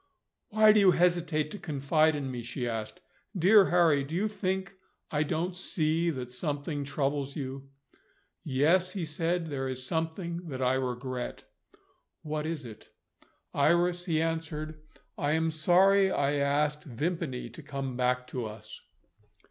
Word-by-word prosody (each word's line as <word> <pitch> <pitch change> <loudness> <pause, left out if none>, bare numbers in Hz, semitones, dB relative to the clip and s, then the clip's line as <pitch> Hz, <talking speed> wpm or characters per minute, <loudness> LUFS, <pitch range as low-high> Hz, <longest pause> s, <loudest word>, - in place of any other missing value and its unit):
"Why 215 -1 +6
do 215 - +5
you 195 -2 +6
hesitate 170 -3 +1
to 205 - -7
confide 155 +1 +2
in 140 -3 -3
me?" 125 -1 -4
she 120 +1 -4
asked. 115 +9 -4 0.4
"Dear 195 +3 +6
Harry, 165 -5 +4
do 150 +4 -6
you 200 +5 +1
think 190 -2 -2 0.4
I 150 - +1
don't 170 +4 -1
see 165 -2 0
that 130 -5 -4
something 145 +2 -3
troubles 140 0 -2
you?" 135 -1 -6 0.7
"Yes," 165 +7 +2
he 190 -5 -3
said, 165 +3 -1
"there 135 -4 -3
is 130 0 -3
something 170 +2 -3
that 130 -3 -5
I 130 0 +2
regret." 130 -1 -3 0.8
"What 155 0 -3
is 160 -4 -4
it?" 110 -2 -11 0.6
"Iris," 175 +2 +2
he 160 -4 +1
answered, 160 -1 -3 0.4
"I 145 +1 +1
am 160 0 +1
sorry 190 +5 +4
I 145 -5 +1
asked 145 +1 +1
Vimpany 145 -2 -3
to 120 - -10
come 135 -3 -5
back 125 0 +1
to 125 -4 -3
us." 110 0 -10
155 Hz, 150 wpm, -29 LUFS, 135-170 Hz, 0.8 s, Why